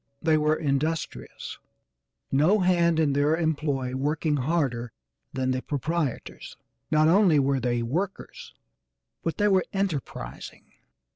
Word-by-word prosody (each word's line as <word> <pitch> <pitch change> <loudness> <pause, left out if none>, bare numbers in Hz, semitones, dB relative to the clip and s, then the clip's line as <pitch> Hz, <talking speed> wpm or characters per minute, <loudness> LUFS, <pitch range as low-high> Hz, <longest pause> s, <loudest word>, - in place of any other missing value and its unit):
They 160 -1 +2
were 155 0 +2
industrious, 155 +2 -3 0.7
no 160 +10 +3
hand 170 -2 +3
in 150 -3 +2
their 145 +3 +2
employ 145 -6 -1
working 150 +2 0
harder 130 -5 -1 0.4
than 130 -1 -1
the 130 0 -1
proprietors. 150 0 -3 0.3
Not 155 0 +4
only 180 -2 +5
were 135 -1 +2
they 120 -1 0
workers, 180 +12 -4 0.7
but 165 - -3
they 205 - +3
were 190 -3 +3
enterprising. 195 -8 -4
155 Hz, 120 wpm, -26 LUFS, 135-170 Hz, 0.7 s, only